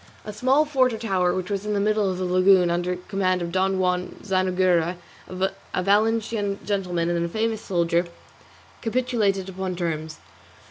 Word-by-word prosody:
A 210 - -6
small 260 +8 +3
fort 260 -4 +2
or - - -3
tower 190 -5 +1
which 185 +1 -3
was 200 0 -2
in 210 0 -2
the - - +1
middle 210 -1 +1
of 185 - -3
the 185 - -3
lagoon 185 0 +4
under 175 +1 -1
the 180 - -11
command 185 -2 +1
of 170 - -4
Don 190 +1 +1
Juan 180 -1 -1
Zanoguera, 185 -3 +1 0.3
a 185 0 -3
Valencian 210 0 +1
gentleman 180 -4 -1
and 170 -1 0
a 170 - -2
famous 220 +2 -1
soldier, 170 -1 0 0.7
capitulated 225 -5 0
upon 190 -1 -4
terms. 160 -3 -3
190 Hz, 170 wpm, -24 LUFS, 180-210 Hz, 0.7 s, lagoon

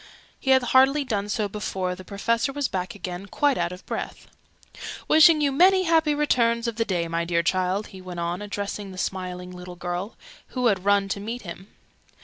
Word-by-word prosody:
He 265 - -4
had 260 -1 +6
hardly 265 +4 +4
done 210 -5 -2
so 210 0 0
before 190 -3 -3
the 185 +1 -10
Professor 230 +6 -1
was 285 -1 -1
back 185 -2 -4
again, 185 0 -6
quite 285 +6 +1
out 170 -4 -1
of 180 +1 -10
breath. - - -5 0.8
"Wishing 315 0 +7
you 285 -1 +2
many 370 +6 +5
happy 320 -3 +3
returns 235 -5 +2
of 230 -1 -3
the 225 - +1
day, 175 -4 -1
my 165 0 -1
dear 170 0 0
child!" 185 +3 0
he 190 - -10
went 180 -1 -7
on, 170 +2 -2
addressing 205 -1 -5
the 185 - -10
smiling 180 -1 -4
little 180 0 -9
girl, 175 +5 -4 0.4
who 250 - +1
had 195 -5 +2
run 200 -1 +3
to 200 - -2
meet 230 +4 -5
him. 185 +1 -9
200 Hz, 195 wpm, -25 LUFS, 180-250 Hz, 0.8 s, Wishing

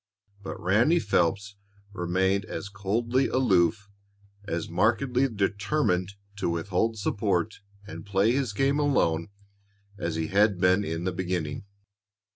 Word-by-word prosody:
But 95 - -7
Ranny 115 - +3
Phelps 100 - 0 0.4
remained 95 +2 0
as 100 -2 -6
coldly 115 +6 0
aloof, 100 -5 +2 0.6
as 85 -4 -3
markedly 125 +8 +1
determined 100 -2 0 0.2
to 100 - -1
withhold 95 +6 -1
support 100 -1 -1 0.3
and - - -9
play 100 +2 +2
his 130 -3 0
game 135 +7 +1
alone 85 - +1 0.7
as 85 -2 -2
he 80 -1 -2
had 100 -1 +3
been 90 +2 +3
in 80 -2 -3
the 95 - -1
beginning. 90 -2 -3
100 Hz, 120 wpm, -27 LUFS, 90-115 Hz, 0.7 s, Ranny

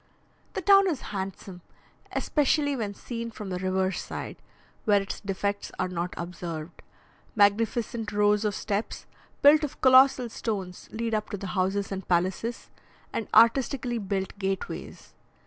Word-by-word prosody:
The 380 - -4
town 395 +1 +6
is 305 -7 -2
handsome, 190 -1 -5 0.5
especially 290 -1 +1
when 210 -5 -3
seen 230 +1 -5
from 210 -3 -7
the 180 - -2
river 185 0 0
side, - - -6 0.5
where 205 -2 +5
its 195 - -5
defects 200 0 -3
are 185 - 0
not 180 0 -4
observed. 170 -2 -6 0.5
Magnificent 220 +2 +2
rows 210 0 +3
of 210 -2 0
steps, 205 +2 -3 0.4
built 295 +2 +7
of 295 - -4
colossal 260 -1 +6
stones, 195 -6 -5
lead 230 0 -3
up 215 -1 -1
to 205 - -4
the 195 -1 -6
houses 195 +1 0
and 190 -1 -5
palaces, 185 +7 -1 0.4
and - - -2
artistically 245 0 +4
built 195 -1 -3
gateways. 195 -1 -4
205 Hz, 140 wpm, -27 LUFS, 190-235 Hz, 0.5 s, built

